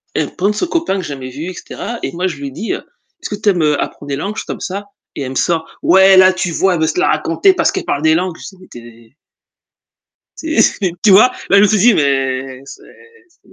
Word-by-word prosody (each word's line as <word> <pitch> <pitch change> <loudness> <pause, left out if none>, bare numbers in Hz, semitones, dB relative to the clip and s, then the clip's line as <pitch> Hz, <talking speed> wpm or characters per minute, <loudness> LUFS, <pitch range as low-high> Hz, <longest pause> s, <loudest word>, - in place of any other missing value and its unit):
elle 150 - 0
me - - -16
présente 200 +3 0
son 355 - -1
copain 335 - -1
que - - -3
j'ai 170 - -7
jamais 130 -2 -8
vu 140 +5 -7
et - - -7
cetera 235 +6 -7
et - - -3
moi 180 +2 -1
je 165 -6 -5
lui 140 -1 -6
dis, 215 +12 -4
heu: - - -4 0.4
«Est-ce - - -6
que 210 - -3
tu 210 - +3
aimes, 180 -4 +1
heu, 150 -1 +1
apprendre 145 - -6
des 140 - -1
langues, 200 +8 -4
juste - - -6
comme - - -5
ça?» 200 +2 -5 0.3
et - - -5
elle 130 - -5
me - - -8
sort: 165 +3 0 0.2
«Ouais 190 +1 +6
là, 185 0 +6
tu 185 -1 -3
vois? 185 +2 +1
Elle 160 - -3
veut 160 - +2
se 160 - -2
la - - +2
raconter 165 - +2
parce - - +1
qu'elle 385 - -4
parle 145 - -2
des 160 0 +4
langues». 180 -1 -2
C'est 190 - -11
tu - - -10
es 115 +1 -17 1.2
c'est 320 0 +1
c'est, 190 -4 +1
tu 210 - +5
vois? 215 +7 +6 0.2
Là, 200 - +5
je 200 - +6
me - - +5
suis 215 0 +1
dit: 235 +4 +5
Mais 135 -3 -1
c'est - - -12 0.5
c'est 345 - -29
180 Hz, 270 wpm, -16 LUFS, 140-200 Hz, 1.2 s, Ouais